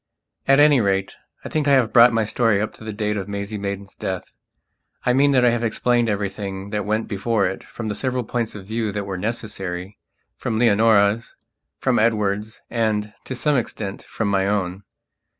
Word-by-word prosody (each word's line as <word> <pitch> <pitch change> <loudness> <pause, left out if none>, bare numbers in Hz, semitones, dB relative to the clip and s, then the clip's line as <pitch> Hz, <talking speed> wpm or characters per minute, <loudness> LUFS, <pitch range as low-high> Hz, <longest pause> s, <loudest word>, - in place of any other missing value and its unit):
At 135 +1 +6
any 145 -3 +6
rate, 95 -1 0 0.3
I - - -4
think 155 -2 0
I 140 - +5
have 125 -5 +3
brought 120 +1 +8
my 115 -1 +1
story 115 -1 +2
up 110 - -2
to - - -14
the 110 - -4
date 105 0 -2
of 95 -1 -4
Maisie 100 +1 -4
Maidan's 100 0 -5
death. 95 -1 -5 0.7
I 125 - +3
mean 140 +3 +4
that 130 -3 +4
I 120 - +5
have 120 0 -1
explained 120 +1 +1
everything 100 -1 -3
that 105 -1 -2
went 110 +1 0
before 105 0 0
it 95 +1 -3
from 110 - -7
the 105 - -1
several 130 +2 -1
points 115 -1 -3
of 100 -2 -8
view 110 0 -2
that 100 -1 -3
were 95 -1 -4
necessaryfrom 105 +1 -5
Leonora's, 110 -1 +3 0.4
from - - +1
Edward's 105 -1 0
and, 105 -2 -1
to 130 - -4
some 150 +2 +1
extent, 105 -4 -4
from 110 - -3
my 95 -1 +1
own. 95 -2 -1
110 Hz, 185 wpm, -22 LUFS, 100-115 Hz, 0.7 s, brought